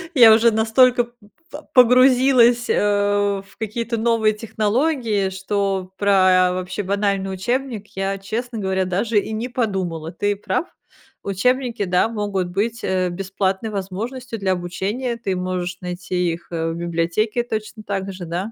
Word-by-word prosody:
я 230 -4 +9
уже 230 +1 +5
настолько 240 +3 +4
п 235 - -23 0.4
по 295 - -8
погрузилась, 250 -1 +5
э, - - +2 0.6
в 195 - -22
какие-то 230 +2 -3
новые 225 -1 +2
технологии, 220 0 0
что 190 0 -2
про 185 -2 +4
вообще 185 +2 -4
банальный 195 0 -1
учебник 235 +2 -2
я, 195 +1 -2
честно 225 +5 -5
говоря, 190 -2 0
даже 200 +5 0
и 210 - -5
не 220 +3 -3
подумала. 190 -9 -2
Ты 205 +4 -1
прав. 200 - -2 0.6
Учебники, 240 +4 0
да, 180 +2 +2
могут 205 -4 -2
быть, 220 +6 -2
э, 185 -1 0
бесплатной 195 +3 -2
возможностью 220 +5 -5
для 190 -1 +1
обучения. 200 +8 -3
Ты 195 -5 -2
можешь 180 -1 -3
найти 180 -1 -2
их, 170 +1 -10
э, 165 -1 -2
в - - -5
библиотеке 170 +7 -1
точно 215 -1 -5
так 195 -1 -3
же, 185 -1 -8
да. 180 +6 -4
200 Hz, 145 wpm, -21 LUFS, 185-230 Hz, 0.6 s, я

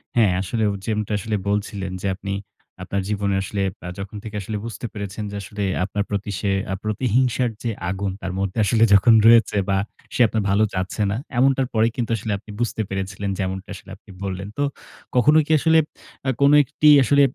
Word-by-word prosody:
হ্যাঁ 110 -5 +4
আসলে 110 +4 -2
হু 100 - -2
যেমনটা 105 -1 -2
আসলে 110 +1 -2
বলছিলেন 100 -2 -2
যে 100 - -2
আপনি 100 0 -5 0.5
আপনার 100 0 -2
জীবনে 100 -1 0
আসলে 100 +1 -3 0.3
আ - - -4
যখন 100 +2 -6
থেকে 110 -1 -8
আসলে 105 +2 -4
বুঝতে 115 +1 -6
পেরেছেন, 100 +1 -5
যে - - -6
আসলে 100 +2 -5 0.2
আপনার 100 +2 -2
প্রতি 100 0 -3
সে 100 - -1 0.2
আ - - 0
প্রতিহিংসার 125 +3 +1
যে 120 - -1 0.2
আগুন 95 0 -2
তার 95 - -3
মধ্যে 100 +1 -2
আসলে 115 +2 +3
যখন 105 +4 +6
রয়েছে 115 -3 +6
বা 95 - +2 0.4
সে - - +1
আপনার 110 -1 -1
ভালো 100 +2 +3
চাচ্ছে 95 +3 -3
না। - - -1 0.2
এমনটার 135 0 +3
পরে 110 +1 +3
কিন্তু 115 -2 -2
আসলে 105 0 -4
আপনি 105 - -13
বুঝতে 115 -2 -1
পেরেছিলেন 95 +1 -3
যেমনটা 95 +1 -3
আসলে 100 - -13
আপনি 105 - -25
বললেন। 95 0 -4
তো 145 - +1 0.5
কখনো 150 +5 +5
কি 160 - -3
আসলে 160 +1 +4 0.5
আ - - +3
কোনো 140 +1 +6
একটি 150 +3 0 0.2
আসলে 140 +4 +4
105 Hz, 195 wpm, -22 LUFS, 100-115 Hz, 0.5 s, যখন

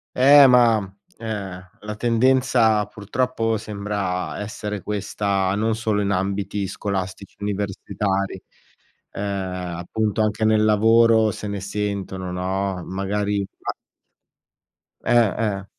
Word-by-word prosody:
Eh, 140 +2 +8
ma, 120 -3 +6 0.4
ehm, 100 -5 -6
la 105 0 -6
tendenza 120 -2 +3
purtroppo 115 +2 -1
sembra 100 -3 -3
essere 105 -1 -5
questa, 100 -2 -1
non 110 +2 0
solo 110 -2 0
in 100 0 0
ambiti 100 +1 -1
scolastici 95 -1 -4
universitari, 100 -1 -2 0.7
uhm, - - -5 0.6
appunto, 105 +5 -2
anche 110 0 +1
nel 110 0 +4
lavoro 110 +1 +5
se 105 - -6
ne 100 -1 -4
sentono, 100 -2 -4
no, 95 0 -2
magari 100 +2 -1 0.2
a - - -2 1.3
Eh, 115 -5 +4 0.3
eh. 95 - -11
105 Hz, 105 wpm, -22 LUFS, 95-110 Hz, 1.3 s, Eh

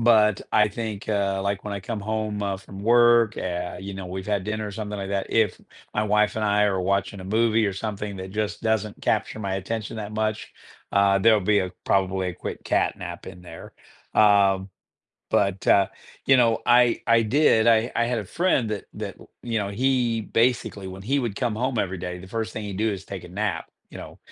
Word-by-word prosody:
But 110 -3 +4
I 105 - +5
think, 110 -1 -5
uh, 100 -2 0
like 100 0 -2
when 105 - -4
I 100 - -4
come 110 +2 -4
home, 110 0 -2
uh, 100 -1 -1
from 95 0 -12
work, 120 0 +4
eh, 90 -1 -4
you 100 0 -6
know, 95 -1 -6
we've 95 +2 -6
had 100 -3 0
dinner 110 0 -3
or - - -6
something 105 0 -5
like 95 -1 -5
that. 100 -1 -1
If 110 -2 +1 0.3
my 105 - 0
wife 105 +1 +2
and 110 - -1
I 105 0 +3
are 95 -1 -1
watching 100 +2 -1
a 95 - -8
movie 110 +1 +2
or 100 - -1
something 100 0 -5
that 95 0 -7
just 105 +1 -3
doesn't 110 -2 -1
capture 110 - 0
my 100 -2 -2
attention 110 +3 -4
that 105 -1 -6
much, 110 0 -2 0.4
uh, 100 0 +4
there'll 110 +1 +5
be 105 +2 +3
a 95 -2 -2
probably 95 -1 +1
a - - -3
quick - - -6
cat - - +1
nap 85 -1 -8
in 90 -1 -10
there. 80 -2 -11 0.4
Um, 100 -2 +4 0.6
but, 100 -1 0
uh, 100 -1 +5 0.4
you 135 -1 +6
know, 115 -2 +4
I 120 -1 +4
I 115 0 +4
did 115 -2 +3
I 115 +1 +4
I 120 - +2
had 120 0 -1
a 105 - -6
friend 135 - +1
that, 105 -2 -4
that, - - -6 0.3
you 115 -2 -1
know, 100 -1 -2
he 120 0 +1
basically, 115 -4 0
when 95 +1 -9
he 140 +6 +1
would 115 -6 -3
come 120 0 -1
home 125 +1 -1
every 95 -3 -1
day, 90 0 -5
the 95 - -11
first 110 +1 -3
thing 110 - -5
he 100 -1 -5
do 110 +3 0
is 95 -1 -6
take 95 -2 -7
a - - -12
nap, 95 -3 -2 0.3
you - - -9
know, - - -10
105 Hz, 220 wpm, -24 LUFS, 95-110 Hz, 0.6 s, you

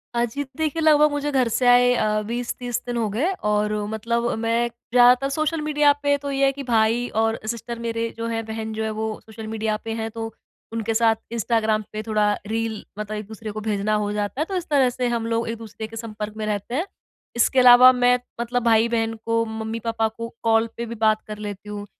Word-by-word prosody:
हाँ 235 0 +2
जी, 280 +5 -4
देखिए 315 0 -1
लगभग 300 -1 +5
मुझे 290 0 -2
घर 260 -3 +2
से 245 +2 +1
आए 245 0 +6
अ, 215 -2 +1
20-30 245 +1 -3
दिन 240 -1 -3
हो 220 -3 0
गए 275 - 0 0.2
और 210 0 +1
मतलब 235 +2 -1
मैं 230 +1 +1
ज़्यादातर 245 +3 +3
सोशल 310 +2 -1
मीडिया 295 -1 +3
पे 285 0 +3
तो 280 0 -5
ये 275 0 +2
है 270 - +4
कि 280 0 -7
भाई 230 0 +2
और 225 0 0
सिस्टर 235 +1 -4
मेरे 230 0 -2
जो 230 0 -3
हैं 225 -1 -2
बहन 220 0 -5
जो 220 0 -3
है, 220 - -1
वो 220 0 -3
सोशल 220 0 -9
मीडिया 220 -1 -1
पे 225 - -3
हैं, 225 0 -3
तो 225 -1 -6 0.4
उनके 225 0 -1
साथ 225 0 +3 0.2
इंस्टाग्राम 220 -2 +1
पे 215 - -3
थोड़ा 210 -1 +1 0.2
रील 225 -1 -2 0.2
मतलब 210 0 -4
एक-दूसरे 215 +1 -7
को 215 +1 -6
भेजना 210 0 -1
हो 205 -1 -1
जाता 210 +7 -2
है। - - +1
तो 385 - -5
इस 345 - -4
तरह 270 -4 +4
से 245 0 -2
हम 235 -1 -1
लोग 230 0 -1
एक-दूसरे 220 -1 -6
के 225 - -11
संपर्क 215 -2 -6
में 215 - -3
रहते 210 +3 -3
हैं। 335 +6 0 0.5
इसके 245 +2 +3
अलावा 250 +1 +9
मैं 250 0 +3 0.2
मतलब 245 0 -1
भाई-बहन 225 0 +2
को, 230 0 +2
मम्मी-पापा 225 0 -2
को, 230 +1 -6 0.2
कॉल 225 0 +3
पे 235 - -3
भी 235 +1 -6
बात 215 0 +2
कर 210 0 -6
लेती 210 -1 -7
हूँ। 205 0 -5
230 Hz, 215 wpm, -23 LUFS, 220-245 Hz, 0.5 s, अलावा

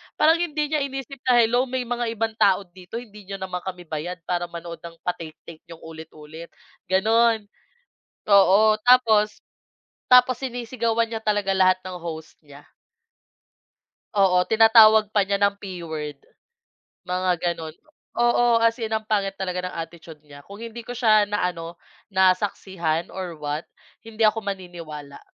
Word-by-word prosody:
parang 325 +2 +4
hindi 300 -3 -2
niya 305 - +1
iniisip 270 -1 -5
na 250 - +5
hello 240 +2 +3
may 255 0 -2
mga 240 0 -3
ibang 225 0 -1
tao 195 0 +4
dito 180 +3 -13
hindi 210 -5 -9
niyo 195 - -5
naman 185 -1 -5
kami 180 -1 -7
bayad 165 +2 -6
para 175 0 -2
manood 170 0 -8
ng 170 -1 -11
pa-take-take 165 -2 -7
niyong 165 -1 -13
ulit-ulit, 160 0 -11 0.4
gano'n, 220 +4 +3 0.9
oo, 205 +2 +5
tapos 220 -4 +4 0.7
tapos 250 0 +5
sinisigawan 235 -2 -2
niya 225 - -3
talaga 205 -2 0
lahat 185 -1 +3
ng 180 -1 -7
host 160 -1 -8
niya. 145 -1 -16 1.5
Oo, 185 -3 +3
tinatawag 220 -1 +6
pa 205 -2 +2
niya 200 0 -1
ng 200 0 +2
P 190 -3 -8
word, 150 -3 -6 0.8
mga 180 0 0 0.2
gano'n, 160 -1 -8 0.5
oo, 240 0 +3
as 230 +1 +1
in 220 - -2
ang 220 0 -2
pangit 200 -2 -1
talaga 180 -1 -3
ng - - -10
attitude 165 -1 -8
niya 145 -1 -13
kung 200 +7 -12
hindi 230 +1 -8
ko 245 +1 -8
siya 215 -4 +4
na 205 -3 0
ano, 165 0 -9 0.3
nasaksihan 185 -3 0
or 180 -3 -6
what 150 +1 -5 0.3
hindi 225 -1 -1
ako 220 +1 +2
maniniwala, 170 -7 -8
195 Hz, 150 wpm, -23 LUFS, 170-225 Hz, 1.5 s, tinatawag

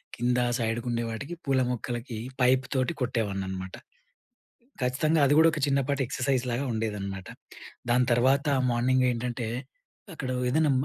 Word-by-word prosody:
కింద 125 +1 +1 0.2
సైడ్‌కుండే 115 +1 -1
వాటికి 140 +9 -5
పూల 135 -1 +2
మొక్కలకి 120 0 -4 0.2
పైప్ 130 +1 +4
తోటి 130 +5 +1
కొట్టేవాడిని 110 -6 -1
అనమాట. 95 0 -5 1.1
ఖచ్చితంగా 155 +5 +2
అది 145 - +4
గూడా 160 +1 +7
ఒక 155 - -3
చిన్నపాటి 140 0 +1
ఎక్సర్సైజ్ 130 -1 0
లాగా 120 +4 -1
ఉండేదనమాట. 100 -4 -3 0.6
దాని 125 +1 +4
తర్వాత 135 +5 +3 0.2
మార్నింగ్ 130 +2 +2
ఏంటంటే, 120 -1 -3 0.7
అక్కడ 135 -5 -5 0.2
ఏదైనా 150 +1 +3
125 Hz, 125 wpm, -27 LUFS, 115-135 Hz, 1.1 s, గూడా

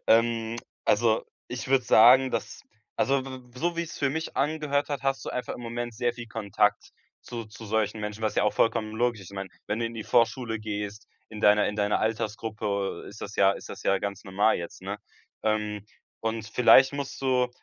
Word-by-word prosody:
Ähm, 115 0 +3 0.3
also, 110 +1 +3 0.2
ich 125 0 -5
würde 130 -2 +3
sagen, 125 +3 +7
dass, 115 - -4 0.3
also, 135 -1 +2
w 135 - -7 0.3
w - - -10
so 170 +4 0
wie's 170 -1 -4
für 140 -2 +1
mich 160 +3 -4
angehört 145 0 0
hat, 145 -3 -3
hast 135 0 0
du - - -4
einfach 125 - -3
im - - -9
Moment 120 0 -4
sehr 120 +1 0
viel 120 0 -8
Kontakt 110 -3 0 0.3
zu 115 -1 -6
zu 110 +1 -11
solchen 110 0 0
Menschen, 105 +1 -5
was 110 - 0
ja - - +4
auch 105 - +2
vollkommen 110 -1 +1
logisch 120 -1 0
ist. 95 - -11
Ich - - -10
meine, 95 0 -4 0.2
wenn 105 +2 -1
du 115 - 0
in 115 - -7
die 110 -2 -5
Vorschule 115 -1 +2
gehst, 105 -1 -5 0.2
in 105 -1 -8
deiner 105 0 +5
in 105 - -4
deiner 105 0 +1
Altersgruppe, 110 -2 -2
äh, - - -8
ist 105 - -11
das 105 - -7
ja 100 0 +5
ist - - -9
das - - -8
ja 95 - +2
ganz 100 -1 -5
normal 100 +3 +2
jetzt, 85 +2 -8
ne? 100 +2 -4 0.4
Ähm, 105 -1 -1 0.4
und 110 -1 -2
vielleicht 125 +4 +6
musst 140 -1 -5
du 130 -2 +2
110 Hz, 210 wpm, -27 LUFS, 105-125 Hz, 0.4 s, sagen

